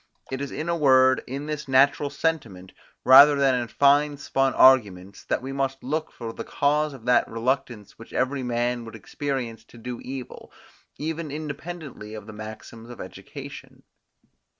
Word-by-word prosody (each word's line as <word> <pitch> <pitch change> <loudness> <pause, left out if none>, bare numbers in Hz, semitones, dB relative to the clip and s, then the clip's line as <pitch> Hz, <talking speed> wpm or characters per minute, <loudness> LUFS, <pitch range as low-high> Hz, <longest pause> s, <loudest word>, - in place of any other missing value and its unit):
It 130 +1 -3
is 140 - -3
in 155 - -5
a 170 - +1
word, 130 -4 +4
in 140 +3 -5
this 150 -1 -5
natural 140 +2 +3
sentiment, 125 - -3 0.3
rather 140 +3 +9
than 140 -2 +3
in 120 -1 -1
fine 145 +4 +3
spun 135 -1 0
arguments, 100 -8 +4
that - - -1
we 135 - -5
must 135 -1 -2
look 155 +4 -3
for 115 -1 -7
the - - -6
cause 150 +1 0
of 125 -4 -13
that 125 0 +3
reluctance 120 -3 -3
which 115 - -13
every 135 +1 -1
man 120 0 -1
would 115 - -10
experience 130 -6 -4
to 120 - -17
do 120 +1 -6
evil, 130 -1 -8 0.5
even 160 +1 -4
independently 150 -6 -7
of 105 -2 -9
the 110 - -10
maxims 110 +2 -10
of 120 - -10
education. - - -10
130 Hz, 165 wpm, -25 LUFS, 120-145 Hz, 0.5 s, rather